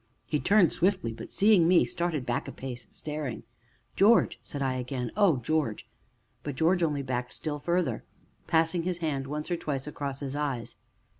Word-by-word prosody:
He 150 - 0
turned 200 -2 +4
swiftly, 185 - +1
but, - - -9
seeing 200 -5 +5
me, 175 0 +5
started 170 -6 -2
back 120 -1 -1
a - - -5
pace, 125 -4 -7
staring. 150 -5 -5 0.5
"George!" 220 +4 +4
said 145 - -7
I 130 -2 0
again. 125 -1 -3
"Oh, 195 -8 +4
George!" 130 -3 -1 0.5
But 145 0 -5
George 170 +5 +2
only 150 -4 +1
backed 125 -1 -3
still 150 -2 -3
farther, 175 +3 0 0.4
passing 165 +1 +2
his 180 +1 -2
hand 145 -5 -2
once 150 +4 -4
or 175 - +1
twice 140 -4 -3
across 140 -2 -5
his 140 0 -4
eyes. 140 -9 -3
150 Hz, 170 wpm, -28 LUFS, 135-170 Hz, 0.5 s, seeing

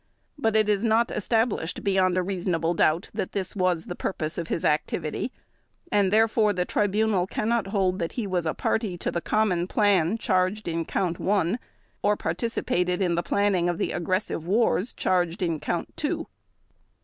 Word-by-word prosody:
But 225 -7 0
it 215 -1 +4
is 210 0 +1
not 230 +1 +2
established 215 -5 0
beyond 190 -2 +2
a 185 - +2
reasonable 175 -3 -1
doubt 165 +1 +1
that - - -3
this 190 0 -3
was 180 -4 +1
the - - -5
purpose 155 -4 -3
of 165 - -4
his 165 - -2
activity, 155 +7 -1 0.6
and 200 -2 +3
therefore 220 -1 +3
the 180 -1 -1
Tribunal 205 -2 +1
cannot 220 0 0
hold 195 -2 0
that 170 -2 -3
he 235 - -2
was 180 -4 -1
a 160 - -1
party 215 -6 -1
to - - -2
the 170 - -2
common 185 -5 +1
plan 200 -2 +2
charged 190 -1 0
in 165 0 -1
Count 175 -2 -1
One 195 +2 +1 0.4
or 205 0 +2
participated 180 -1 -1
in 180 -3 +1
the 170 - +1
planning 190 -2 +1
of 175 - -1
the - - -1
aggressive 175 -1 -2
wars 220 +1 +2
charged 180 0 0
under 165 -3 -1
Count - - -3
Two. - - -2
185 Hz, 175 wpm, -26 LUFS, 175-210 Hz, 0.6 s, it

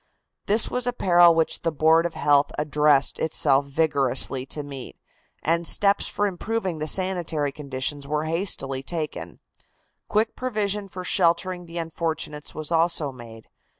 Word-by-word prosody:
This 215 +2 +4
was 250 0 -2
a 245 - 0
peril 175 -5 +5
which 160 -1 0
the 165 - 0
Board 160 +2 +3
of 170 - -12
Health 145 -1 +3
addressed 150 -2 +2
itself 140 -3 +2
vigorously 135 -3 +1
to 150 +2 -2
meet, 140 -3 -9 0.5
and 170 +1 +1
steps 200 0 +3
for 205 - -1
improving 190 -2 -3
the 155 - -3
sanitary 170 -6 0
conditions 140 0 -4
were 150 +1 -1
hastily 155 -6 -2
taken. 155 +1 -5 0.7
Quick 215 +1 0
provision 210 -5 -1
for 185 -1 -8
sheltering 175 0 +1
the 165 +1 -8
unfortunates 160 -2 -4
was 155 +1 -4
also 165 -3 +1
made. 115 -3 -13
160 Hz, 145 wpm, -24 LUFS, 145-180 Hz, 0.7 s, peril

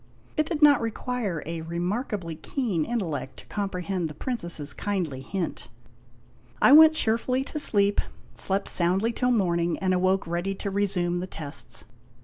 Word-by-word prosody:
It 310 0 +1
did 315 -3 -1
not 290 -4 +7
require 225 - -3
a 165 +1 -4
remarkably 175 +2 -3
keen 190 - -2
intellect 175 - -3
to - - -12
comprehend 190 -3 -3
the 150 - -9
Princess's 170 - -1
kindly 175 -10 -3
hint. 180 +5 -4 0.9
I - - +6
went 315 +1 +9
cheerfully 250 +2 +1
to 300 - -4
sleep, 205 -7 +3 0.3
slept 195 +1 -2
soundly 190 +6 +1
till 250 +1 0
morning, 175 -7 +1
and 185 -1 0
awoke 185 +1 +2
ready 175 +3 -2
to 200 - -4
resume 185 -3 0
the 185 - -4
tests. 150 -5 -4
195 Hz, 145 wpm, -26 LUFS, 170-230 Hz, 0.9 s, went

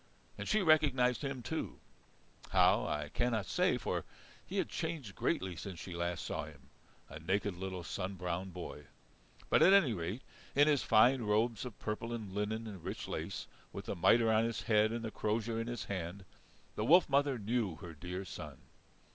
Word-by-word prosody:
And - - -6
she 215 -2 +3
recognized 140 -6 +4
him 135 -3 -3
too 160 +7 -4 0.7
how - - +4
I 75 0 -2
cannot 115 -1 0
say, - - +2
for - - -2 0.4
he - - -6
had - - +1
changed 135 -12 -4
greatly 95 -1 -1
since 90 0 -7
she 90 - -7
last 85 0 -2
saw 80 -1 -3
him, 70 -3 -15 0.4
a 80 - -9
naked 95 +4 0
little 95 0 -5
sun 95 +2 -4
browned 90 +1 -3
boy. 85 -4 -7 0.7
But, - - +5
at 190 - +8
any 165 - +5
rate, 95 +7 -4 0.3
in 145 +2 +6
his 145 -3 +4
fine 125 +4 +5
robes 110 0 +1
of 120 -5 -8
purple 115 +2 -4
and 105 -5 -5
linen 105 +2 -2
and 100 -6 -8
rich - - -5
lace, - - -4 0.3
with - - -7
the - - -3
mitre 115 +6 +5
on 110 0 +4
his 115 -1 -2
head 110 -1 +3
and 115 0 -3
the 110 - -4
crozier 115 +2 -1
in 115 - -4
his 120 -2 -3
hand, 95 0 -5 0.5
the 105 - -1
wolf 170 +10 +6
mother 140 -1 +2
knew 110 -4 -1
her 85 -1 -9
dear 90 +5 -5
son. - - -8
105 Hz, 185 wpm, -34 LUFS, 90-120 Hz, 0.7 s, at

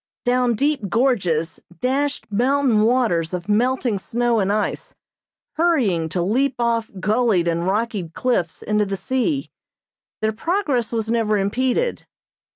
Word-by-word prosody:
Down 245 -1 +2
deep 275 -4 0
gorges 180 - 0 0.2
dashed 275 +3 -1
mountain 250 +1 +2
waters 215 -8 +1
of 175 +1 -6
melting 240 0 +1
snow 240 +3 0
and 195 0 +1
ice, 210 0 -2 0.6
hurrying 240 - +2
to 175 +2 -1
leap 255 +8 +1
off 230 -2 0
gullied 210 -3 +2
and 170 +1 0
rocky 205 -3 -1
cliffs 175 -2 -1
into 210 -1 +1
the 195 0 -3
sea. 260 - -1 0.7
Their 220 0 +1
progress 285 - -1
was 225 -1 -1
never 220 -2 +1
impeded. 255 - -1
230 Hz, 130 wpm, -21 LUFS, 195-255 Hz, 0.7 s, Down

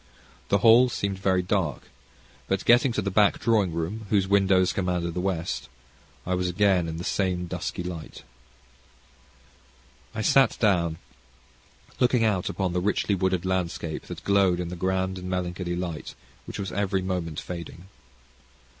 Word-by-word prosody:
The 100 - +4
hall 120 +3 +7
seemed 100 -4 -3
very 95 -1 +1
dark, 90 -6 -1 0.6
but, 95 0 -1
getting 120 +2 +5
to 105 - -1
the 100 - -2
back 105 +1 +4
drawing 105 -6 +2
room, 90 +7 -4
whose 100 -3 +2
windows 95 -2 +3
command 90 -2 -1
the 90 - -3
west, 90 -8 -3 0.6
I 90 - -1
was 90 0 0
again 95 -2 +2
in 80 0 -5
the 85 - -5
same 90 -2 -1
dusky 90 +1 -4
light. 85 -3 -7 1.9
I 110 - -2
sat 130 +3 +4
down, 85 -7 +2 1.0
looking 125 -2 +3
out 100 -5 +1
upon 95 -3 -2
the 90 - 0
richly 100 +1 0
wooded 95 -2 0
landscape 90 -3 -2
that - - -8
glowed 100 -3 +3
in 90 -1 -3
the 90 - -5
grand 95 +1 -1
and 90 0 -6
melancholy 90 -1 -2
light 85 -3 -5 0.3
which - - -7
was 95 -1 -4
every 95 -2 -1
moment 90 -4 -3
fading. 85 0 -8
95 Hz, 155 wpm, -26 LUFS, 90-100 Hz, 1.9 s, hall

